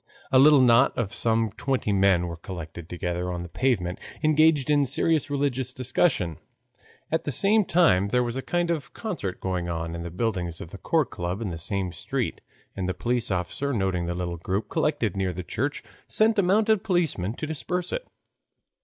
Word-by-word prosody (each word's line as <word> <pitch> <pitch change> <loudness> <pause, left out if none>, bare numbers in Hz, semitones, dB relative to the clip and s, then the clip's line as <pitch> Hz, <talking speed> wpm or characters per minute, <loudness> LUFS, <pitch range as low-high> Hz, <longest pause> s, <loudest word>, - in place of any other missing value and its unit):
A 130 - +6
little 145 0 +7
knot 125 +1 +5
of 105 -5 -2
some 115 -1 +1
twenty 130 -6 -1
men 95 -3 +3
were 85 -1 -5
collected 85 -2 -8
together 90 0 -3
on 90 -1 -4
the 90 - -8
pavement, 95 -7 0 0.2
engaged 155 -2 +4
in 145 -2 +3
serious 150 +2 +1
religious 135 -3 -1
discussion. 125 - 0 0.7
At 160 - +1
the 145 - -1
same 200 - +4
time 160 - +4
there 125 +4 +2
was 120 0 -3
a 135 - -2
kind 175 +3 0
of 160 -4 -4
concert 180 - -4
going 90 -2 -2
on 85 0 -3
in 85 - -5
the 85 - -5
buildings 90 -3 -2
of 80 - -9
the 100 - -9
Court 160 -5 +1
Club 90 +3 -3
in 110 -5 -3
the 80 - -6
same 95 +1 -1
street, 85 - -3 0.3
and 95 -1 -2
a 95 - -2
police 120 -1 -1
officer 95 +10 -2
noticing 95 -5 0
the 85 - -2
little 85 -1 -3
group 95 +5 -3
collected 150 - 0
near 95 -2 -1
the 90 +1 -5
church 140 +11 -3 0.2
sent 220 0 +3
a - - +6
mounted 210 +2 +3
policeman 160 - 0
to 155 - -4
disperse 175 +3 -3
it. - - -3
115 Hz, 190 wpm, -26 LUFS, 90-150 Hz, 0.7 s, little